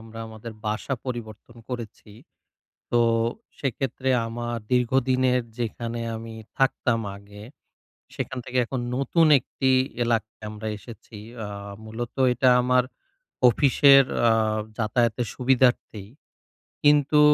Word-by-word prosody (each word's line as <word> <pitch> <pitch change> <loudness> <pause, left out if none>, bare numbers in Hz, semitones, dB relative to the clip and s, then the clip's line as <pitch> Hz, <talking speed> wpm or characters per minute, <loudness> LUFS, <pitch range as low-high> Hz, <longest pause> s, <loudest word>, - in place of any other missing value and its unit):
আমরা 115 0 -11
আমাদের 110 +1 -9
বাসা 110 +5 -2
পরিবর্তন 120 -1 -7
করেছি। 115 -3 -7 0.8
তো 120 - +3 0.6
সেক্ষেত্রে 130 0 -2 0.2
আমার 120 +1 -4 0.2
দীর্ঘদিনের 125 0 +2 0.2
যেখানে 115 0 -3
আমি 115 0 -8 0.2
থাকতাম 130 -3 +1 0.2
আগে। 100 +1 -13 0.7
সেখান 130 - -4
থেকে 125 - -2
এখন 125 +2 -4 0.2
নতুন 160 +4 +2
একটি 130 +1 -1 0.3
এলাকায় 110 -2 -2
আমরা 110 +1 -6
এসেছি। 115 -1 -13 0.3
আ - - -7 0.4
মূলত 115 +2 -6 0.2
এটা 130 +1 +3
আমার 125 0 +3 0.7
অফিসের 135 +2 +6 0.3
আ - - +5 0.5
যাতায়াতের 115 +1 0
সুবিধার্থেই। 125 -5 +1 0.7
কিন্তু 145 0 +4
120 Hz, 105 wpm, -25 LUFS, 110-130 Hz, 0.8 s, অফিসের